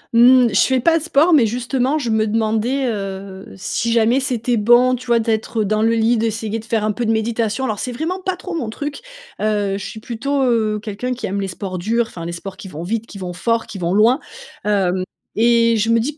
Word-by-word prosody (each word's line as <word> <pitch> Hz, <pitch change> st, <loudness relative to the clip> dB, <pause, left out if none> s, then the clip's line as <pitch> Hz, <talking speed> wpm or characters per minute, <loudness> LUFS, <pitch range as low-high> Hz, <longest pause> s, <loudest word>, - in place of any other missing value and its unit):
Mmh, 245 Hz, +1 st, +7 dB
je 200 Hz, -, +3 dB
fais 260 Hz, -1 st, +3 dB
pas 330 Hz, +6 st, +3 dB
de -, -, -9 dB
sport, 330 Hz, +1 st, +3 dB
mais 260 Hz, -7 st, +5 dB
justement, 250 Hz, +5 st, 0 dB
je 245 Hz, -7 st, -2 dB
me 220 Hz, 0 st, +2 dB
demandais, 225 Hz, +5 st, 0 dB
heu, 195 Hz, -2 st, -5 dB
si 210 Hz, +4 st, -2 dB
jamais 230 Hz, +3 st, +3 dB
c'était 245 Hz, -3 st, -1 dB
bon, 240 Hz, +4 st, +5 dB
tu 255 Hz, 0 st, -5 dB
vois, 235 Hz, -1 st, +4 dB
d'être, 225 Hz, 0 st, -1 dB
heu, -, -, +1 dB
dans 215 Hz, +2 st, 0 dB
le 225 Hz, +1 st, +3 dB
lit, 230 Hz, +1 st, +2 dB
d'essayer 225 Hz, 0 st, -2 dB
de 220 Hz, -, -12 dB
faire 225 Hz, -2 st, 0 dB
un 215 Hz, -, +1 dB
peu 235 Hz, +2 st, -3 dB
de -, -, +3 dB
méditation. 225 Hz, +1 st, -1 dB
Alors, 215 Hz, -4 st, -2 dB
c'est 250 Hz, -, -3 dB
vraiment 325 Hz, +9 st, -3 dB
pas 375 Hz, 0 st, -2 dB
trop 370 Hz, -, -7 dB
mon 245 Hz, -9 st, -3 dB
truc, 285 Hz, -, -5 dB, 0.4 s
heu, 205 Hz, -2 st, 0 dB
je 200 Hz, -, -7 dB
suis 220 Hz, -, -7 dB
plutôt, 265 Hz, +5 st, -2 dB
heu, 220 Hz, -4 st, +1 dB
quelqu'un 220 Hz, +4 st, -4 dB
qui 250 Hz, -, -5 dB
aime 200 Hz, +1 st, -2 dB
les 195 Hz, -, -2 dB
sports 185 Hz, 0 st, -5 dB
durs, 230 Hz, +6 st, +1 dB
enfin, 170 Hz, -5 st, -8 dB
les 170 Hz, -, -4 dB
sports 185 Hz, +2 st, -7 dB
qui 195 Hz, -, -9 dB
vont 165 Hz, -2 st, -7 dB
vite, 225 Hz, +5 st, -3 dB
qui 205 Hz, -, -10 dB
vont 180 Hz, -2 st, -5 dB
fort, 230 Hz, +5 st, 0 dB
qui 195 Hz, -, -8 dB
vont 175 Hz, +1 st, -1 dB
loin, 230 Hz, +6 st, +4 dB, 0.5 s
hem, 190 Hz, -3 st, +1 dB, 0.3 s
et 230 Hz, 0 st, +4 dB
je 220 Hz, +1 st, 0 dB
me 230 Hz, 0 st, +4 dB
dis 275 Hz, +7 st, -2 dB
225 Hz, 240 wpm, -19 LUFS, 210-245 Hz, 0.5 s, Mmh